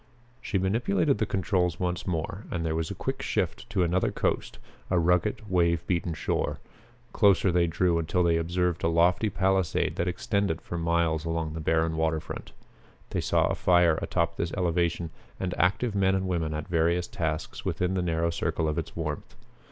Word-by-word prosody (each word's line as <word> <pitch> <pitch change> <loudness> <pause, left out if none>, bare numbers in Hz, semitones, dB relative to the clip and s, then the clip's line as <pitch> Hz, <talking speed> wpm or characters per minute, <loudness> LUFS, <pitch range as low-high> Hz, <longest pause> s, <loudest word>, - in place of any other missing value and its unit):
She 110 - -1
manipulated 95 -1 +1
the - - +1
controls 90 -2 0
once 90 0 -2
more 90 +4 -3
and 85 -2 -2
there 80 - 0
was 80 0 -2
a - - -5
quick - - -3
shift - - -2
to 90 - +1
another 90 +2 +1
coast, - - -1 0.3
a 90 - +2
rugged, 90 +5 +1
wave 85 -3 +2
beaten 85 -2 -1
shore. - - -1 0.5
Closer 100 -3 +4
they 85 0 +3
drew 85 +1 +1
until 90 +3 +1
they 85 -1 +3
observed 90 +1 -1
a - - +3
lofty 85 +6 +3
palisade 95 -3 +1
that 85 - 0
extended 95 -1 0
for - - -7
miles 85 -2 +1
along 80 -1 -2
the 80 - -5
barren 80 +1 +1
waterfront. 80 -1 -2 0.6
They - - 0
saw - - +2
a - - 0
fire 85 -3 +3
atop 85 -1 -1
this 85 - -2
elevation 85 -2 0 0.3
and 90 -1 -2
active 100 +5 +1
men 95 -1 +2
and 95 0 -1
women 80 -4 -1
at 75 +2 -4
various 85 0 +1
tasks 80 -2 -3
within 90 +1 -1
the 95 - 0
narrow 85 -1 0
circle 80 -1 -1
of 75 - 0
its - - -6
warmth. 75 -3 -4
85 Hz, 180 wpm, -27 LUFS, 80-90 Hz, 0.6 s, Closer